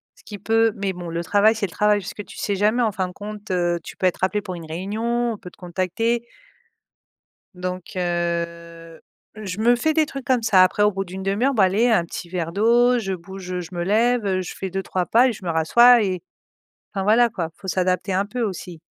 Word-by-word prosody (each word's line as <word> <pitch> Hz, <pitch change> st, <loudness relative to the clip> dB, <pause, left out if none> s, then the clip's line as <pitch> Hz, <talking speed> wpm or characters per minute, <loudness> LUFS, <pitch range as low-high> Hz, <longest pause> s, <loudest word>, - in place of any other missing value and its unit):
ce -, -, -22 dB
qui 205 Hz, -, -8 dB
peut 225 Hz, +2 st, +2 dB
mais 195 Hz, -1 st, -2 dB
bon, 175 Hz, -1 st, -7 dB
le 170 Hz, +1 st, -3 dB
travail, 205 Hz, +4 st, +4 dB
c'est 215 Hz, -, -1 dB
le 180 Hz, -, -8 dB
travail 210 Hz, +2 st, +2 dB
puisque 205 Hz, +2 st, -7 dB
tu -, -, -13 dB
sais 200 Hz, -, -1 dB
jamais 215 Hz, +5 st, +2 dB
en 220 Hz, -, +1 dB
fin 185 Hz, -1 st, -1 dB
de -, -, -12 dB
compte, 210 Hz, +1 st, -8 dB
heu, 175 Hz, -1 st, +1 dB
tu -, -, -10 dB
peux 185 Hz, -, -1 dB
être 180 Hz, -, -2 dB
appelé 205 Hz, +2 st, +1 dB
pour 185 Hz, -3 st, -6 dB
une 165 Hz, -, -8 dB
réunion, 225 Hz, +8 st, -2 dB
on -, -, -8 dB
peut 185 Hz, -4 st, -11 dB
te -, -, -23 dB
contacter. 190 Hz, +7 st, -1 dB, 1.3 s
Donc 185 Hz, +2 st, -6 dB
heu, 170 Hz, -1 st, -3 dB, 0.3 s
je 205 Hz, -2 st, -6 dB
me 240 Hz, +2 st, +5 dB
fais 315 Hz, +6 st, +1 dB
des 315 Hz, -2 st, +3 dB
trucs 275 Hz, -2 st, -7 dB
comme 255 Hz, -4 st, +2 dB
ça 190 Hz, -4 st, +5 dB
après 195 Hz, +3 st, +2 dB
au 210 Hz, -, +5 dB
bout 195 Hz, +1 st, -3 dB
d'1/2 195 Hz, +5 st, -2 dB
heure, 275 Hz, -, +1 dB
bon 210 Hz, -, +3 dB
allez 200 Hz, +6 st, +3 dB
un 215 Hz, -8 st, +3 dB
petit 170 Hz, +1 st, -7 dB
verre 170 Hz, -2 st, -3 dB
d'eau, 240 Hz, +5 st, +4 dB
je 195 Hz, -4 st, -2 dB
bouge, 185 Hz, +1 st, -9 dB
heu, 180 Hz, -, -2 dB
je 175 Hz, -, -8 dB
me 175 Hz, 0 st, -2 dB
lève, 230 Hz, +3 st, +2 dB
heu, 185 Hz, -1 st, 0 dB
je -, -, -7 dB
fais 190 Hz, -1 st, -5 dB
2-3 185 Hz, -1 st, -2 dB
pas 245 Hz, +3 st, +4 dB
et 245 Hz, -, 0 dB
je 195 Hz, -, -11 dB
me 170 Hz, -, -1 dB
rassois 235 Hz, +10 st, +6 dB
et 185 Hz, -4 st, -2 dB, 0.7 s
enfin 195 Hz, -2 st, -2 dB
voilà 235 Hz, +3 st, +5 dB
quoi, 175 Hz, -8 st, -4 dB
faut 190 Hz, -, -11 dB
s'adapter 185 Hz, +1 st, 0 dB
un 195 Hz, +2 st, +1 dB
peu 245 Hz, +3 st, -4 dB
aussi. 180 Hz, -5 st, -5 dB
195 Hz, 235 wpm, -22 LUFS, 180-220 Hz, 1.3 s, rassois